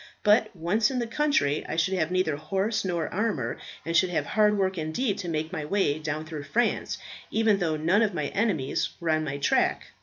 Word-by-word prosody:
But 215 +1 +4
once 185 +7 +1
in 265 - -3
the 240 - 0
country, 230 - +1
I - - -2
should 165 +3 +1
have 170 -4 0
neither 185 -4 +1
horse 195 +8 -1
nor 175 -4 -1
armour, 180 - -1 0.3
and 165 +1 -2
should 185 +2 +4
have 175 - -1
hard 210 -1 +3
work 190 -1 +1
indeed 190 +7 -1
to 180 -3 -4
make 160 +1 -2
my 155 - -3
way 155 -3 +1
down 155 0 -3
through 155 -3 -7
France, 235 +12 0 0.3
even 220 -2 +2
though 160 -4 0
none 170 +7 +3
of 215 -3 +2
my 150 -3 -1
enemies 190 - 0
were 170 -2 0
on 155 0 +2
my 140 -2 -3
track. 140 - +1
175 Hz, 210 wpm, -27 LUFS, 155-210 Hz, 0.3 s, But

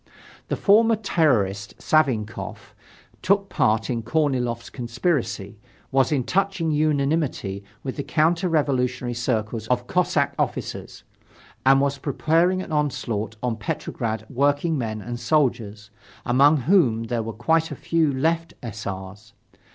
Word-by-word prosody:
The - - -1
former 225 +3 +4
terrorist, 120 - 0
Savinkof, 125 -9 -1 0.5
took 200 +1 +2
part 110 +1 +1
in 120 -2 -2
Korniloff's 125 -3 -1
conspiracy, 120 - -2 0.3
was 135 0 +2
in 140 -4 +1
touching 190 0 0
unanimity 145 -9 0 0.2
with 130 +1 -5
the 140 - -2
counter 165 +5 +1
revolutionary 130 -5 0
circles 115 -2 -2
of 125 -1 0
Cossack 175 -3 +1
officers - - -3 0.6
and 135 0 +7
was 140 0 0
preparing 165 +6 +1
an - - -10
onslaught 115 -8 -1
on 120 -3 -1
Petrograd 110 +1 -3
workingmen 140 -5 0
and 120 0 -5
soldiers, 115 -6 0 0.3
among 140 +4 +4
whom 130 - +3
there 115 0 -2
were 115 +1 -4
quite 160 +9 +1
a - - -5
few 165 -3 +1
left 165 +5 -1
S. 110 -2 -6
R.'s. 100 +2 -7
130 Hz, 125 wpm, -23 LUFS, 115-160 Hz, 0.6 s, and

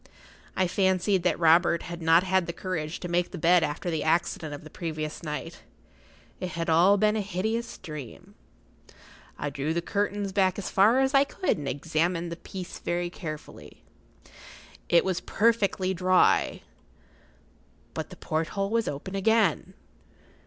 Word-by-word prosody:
I 185 - +2
fancied 190 +1 +1
that 180 - +1
Robert 170 0 +4
had 170 0 -7
not 165 +2 +5
had 190 -2 +1
the 170 - -3
courage 165 -4 -4
to 180 - -4
make 175 0 0
the 185 - -7
bed 175 +2 +4
after 160 +3 -2
the 160 - -1
accident 160 -1 0
of 145 - -8
the 155 - -12
previous 155 -2 -5
night—it 165 +3 -9
had 165 -1 -2
all 180 +5 +5
been 210 +1 +2
a 215 - 0
hideous 220 +4 -3
dream. 150 -8 -9 1.0
I 145 - -3
drew 145 +4 -2
the 170 - 0
curtains 205 0 -1
back 190 -2 +2
as 205 - -4
far 220 +7 +5
as 265 +1 +1
I 275 0 +6
could 325 - -1
and 145 - -5
examined 165 +5 -1
the - - -3
place 180 +1 -8
very 175 0 -2
carefully. 155 -4 -9 1.1
It 170 - +4
was 185 -2 -1
perfectly 200 -4 +1
dry. 185 0 +2 1.3
But - - -5
the - - -10
porthole 195 +6 -2
was 230 0 +1
open 145 +7 -5
again. 220 +3 +1
175 Hz, 150 wpm, -27 LUFS, 165-195 Hz, 1.3 s, I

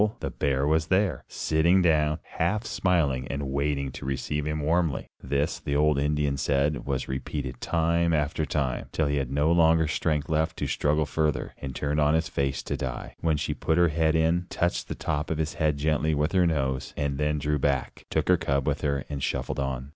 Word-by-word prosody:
the - - -3
bear 70 -1 0
was 80 +1 +2
there, 95 +2 +1
sitting 85 +4 +2
down, 75 -3 +3
half 105 +7 -1
smiling, 75 -9 +1
and 70 +1 -3
waiting 70 0 -1
to - - -9
receive 70 +2 -2
him 75 0 -1
warmly. 80 0 +1 0.2
This, 70 +2 -1
the 70 - -3
old 75 -1 +3
Indian 75 -1 0
said, 70 +1 0
was 65 -2 -1
repeated 65 0 -4
time 85 0 +1
after 75 0 0
time, 70 -4 -1
till 80 - 0
he 70 0 0
had 65 -2 -2
no 75 +4 +2
longer 80 -1 +4
strength 75 -1 0
left 80 -1 0
to - - -2
struggle 75 +1 +1
further, 75 +2 -1
and 65 -2 -6
turned 75 +3 -1
on 75 +1 +4
his 80 0 0
face 70 -1 -1
to - - -3
die, 65 -2 -5
when 80 -2 +1
she 75 - -2
put 80 - 0
her 85 -1 +5
head 80 +1 +1
in, 85 +2 +2
touched 85 +1 -1
the - - -4
top 75 -1 -2
of 80 - -1
his 80 +1 -1
head 80 -4 0
gently 75 +1 +1
with 75 +2 0
her 90 -2 +3
nose 65 -5 -1
and 70 -1 -1
then 75 0 +1
drew 75 +1 0
back, 70 -2 -1
took - - 0
her 90 - +5
cub 70 -4 0
with 70 -1 -1
her 70 -2 -1
and 70 -2 -5
shuffled 65 +2 -2
on. 65 -1 -3
75 Hz, 205 wpm, -27 LUFS, 70-80 Hz, 0.2 s, her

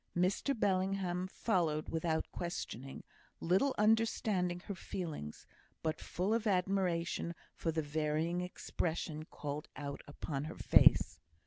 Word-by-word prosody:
Mr 200 +8 +1
Bellingham 185 -2 +1
followed 170 -7 0
without 160 0 0
questioning, 135 -6 -5 0.4
little 190 +11 +2
understanding 210 -5 +2
her 200 - -5
feelings, 160 - -5 0.4
but 160 0 0
full 190 +5 -1
of 230 -1 +1
admiration 180 -3 +1 0.2
for 165 - -1
the 160 0 -1
varying 155 +3 0
expression 160 -3 -3
called 150 -1 -5
out 140 -1 -5
upon 145 -1 -4
her 155 - -7
face. - - +6
175 Hz, 115 wpm, -35 LUFS, 155-190 Hz, 0.4 s, face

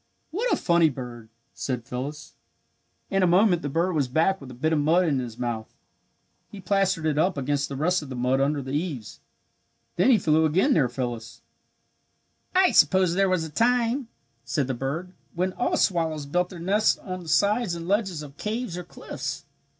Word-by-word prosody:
"What 455 +9 -1
a - - +4
funny 170 -2 +3
bird!" 120 -4 -8 0.2
said 125 -3 -4
Phyllis. 135 +4 -6 0.8
In 195 0 +2
a 185 - +4
moment 180 0 +4
the 145 - -3
bird 170 +6 0
was 145 -5 +1
back 160 +8 +1
with 135 - -10
a 125 - -10
bit 155 +6 0
of 155 - +2
mud 165 +5 +3
in 145 -5 +1
his 120 -3 -6
mouth. 120 -3 -4 0.7
He 205 - -10
plastered 190 -3 +1
it 155 -1 +1
up 180 0 +1
against 140 +1 -1
the 140 - -5
rest 180 +6 +1
of 145 - -9
the 130 - -5
mud 125 +2 +1
under 140 0 0
the 130 - -6
eaves. 145 - -4 0.8
Then 180 +9 +4
he 245 - +6
flew 160 -4 +2
again 190 - +3
near 135 - +3
Phyllis. 120 -2 -5 1.1
"I 375 0 +5
suppose 185 -3 +4
there 195 +1 +2
was 185 -3 +1
a 160 - -7
time," 240 - +1 0.4
said 145 -4 -1
the 130 - -2
bird, 145 +9 -4 0.2
"when 185 +2 0
all 245 - 0
swallows 160 -5 0
built 180 +5 0
their 185 - -9
nests 200 +6 +2
on 185 -2 -6
the 165 - -9
sides 205 +3 +2
and 170 0 -7
ledges 190 -6 0
of 140 -1 -12
caves 215 -4 -3
or - - -6
cliffs. 175 - -6
165 Hz, 195 wpm, -25 LUFS, 140-190 Hz, 1.1 s, he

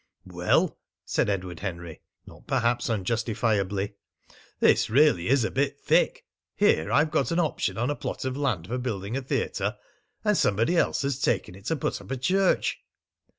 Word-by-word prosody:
"Well," - - +1 0.3
said - - 0
Edward 90 -4 -3
Henry, 85 -4 -6 0.2
not - - -15
perhaps 120 -3 +1
unjustifiably, 105 -2 -1 0.6
"this - - +4
really 130 - +4
is 135 -1 +3
a - - -1
bit 140 +1 -1
thick! - - +2 0.3
Here 80 - +2
I've 155 +2 +3
got 155 - +1
an 170 0 +1
option 130 - -1
on 120 +5 0
a - - -2
plot - - -5
of 130 0 -2
land 130 - -1
for 125 +7 -3
building 110 -3 -3
a 135 - -1
theatre, 130 - -2 0.5
and 210 -1 +3
somebody 115 - +2
else 165 - +1
has 140 -2 -1
taken 100 -9 0
it 95 +2 -14
to 160 - 0
put 145 - -3
up - - -14
a 135 - -2
church!" 185 +9 +1
120 Hz, 170 wpm, -26 LUFS, 100-140 Hz, 0.6 s, this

